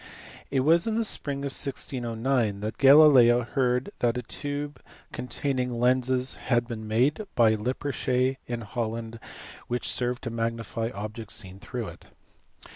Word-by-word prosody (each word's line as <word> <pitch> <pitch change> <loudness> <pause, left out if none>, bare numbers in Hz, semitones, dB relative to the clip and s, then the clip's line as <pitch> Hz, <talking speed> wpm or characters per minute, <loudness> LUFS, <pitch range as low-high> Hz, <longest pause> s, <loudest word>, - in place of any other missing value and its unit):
It 135 -2 +1
was 165 - +4
in 220 - 0
the 230 - +1
spring 140 -9 0
of 140 - -3
1609 120 -5 -1
that 110 +2 -5
Galileo 135 -4 +7
heard 125 0 0
that 120 0 +1
a 125 - -3
tube 145 +3 -4 0.3
containing 125 +1 -2
lenses 130 +1 +2 0.2
had 120 -2 +2
been 110 -3 -6
made 135 - +1
by 110 -2 +5
Lippershey 130 +2 -1
in 120 -1 -3
IJolland 115 +1 -4 0.5
which 120 0 -2
served 125 0 -1
to 115 - -4
magnify 115 0 -2
objects 105 -1 -6
seen 95 -2 -7
through 120 0 -5
it. - - -14
125 Hz, 140 wpm, -27 LUFS, 115-135 Hz, 0.5 s, Galileo